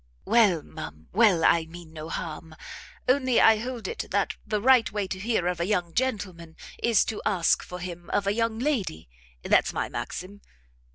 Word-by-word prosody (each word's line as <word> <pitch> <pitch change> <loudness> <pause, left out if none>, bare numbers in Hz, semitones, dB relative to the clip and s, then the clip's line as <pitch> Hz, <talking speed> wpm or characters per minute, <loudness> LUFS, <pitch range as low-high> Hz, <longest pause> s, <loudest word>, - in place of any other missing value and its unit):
"Well, 205 -9 +4
ma'am, 75 +1 -10
well, 195 -6 +4
I 165 -1 +4
mean 165 -1 -12
no 155 0 -7
harm: 160 0 -6 0.5
only 255 -1 +3
I 220 -1 +6
hold 240 +1 -5
it 460 - -4
that - - 0
the 210 - 0
right 235 -4 +4
way 205 -1 -1
to 190 0 -5
hear 215 -3 0
of 180 -1 -1
a 170 - -1
young 180 -5 0
gentleman, 185 -10 -3 0.3
is 235 -3 +3
to 220 - -4
ask 185 -6 +2
for 180 - -8
him 175 -1 -8
of 200 - 0
a 200 - +1
young 230 0 0
lady: 225 - -2 0.3
that's - - +3
my - - -2
maxim. 200 +3 -6
195 Hz, 180 wpm, -26 LUFS, 170-230 Hz, 0.5 s, I